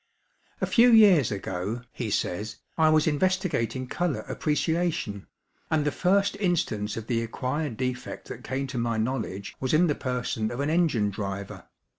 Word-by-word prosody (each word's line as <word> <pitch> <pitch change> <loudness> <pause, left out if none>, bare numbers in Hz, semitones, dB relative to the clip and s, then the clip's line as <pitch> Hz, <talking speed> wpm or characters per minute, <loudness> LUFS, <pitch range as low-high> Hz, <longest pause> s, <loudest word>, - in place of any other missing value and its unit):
'A - - +3
few 245 0 +5
years 195 - +6
ago,' 100 +4 -3
he 120 -4 -4
says, 105 +2 -2 0.2
'I 160 -1 +4
was 155 -1 +4
investigating 155 - 0
colour 170 +3 -1
appreciation, 155 - -1 0.4
and 155 -2 +1
the 145 - +2
first 195 +4 +2
instance 160 - 0
of 115 - -5
the 115 -1 0
acquired 130 +3 -3
defect 125 0 -4
that - - -8
came 135 +1 -2
to 130 -2 -4
my 115 -1 0
knowledge 110 -4 -3
was 130 +3 +1
in 175 +3 +5
the 155 - +2
person 125 -5 -2
of 120 +3 -5
an 145 +2 0
engine 145 -12 +2
driver. 100 -1 -5
130 Hz, 160 wpm, -27 LUFS, 110-160 Hz, 0.4 s, years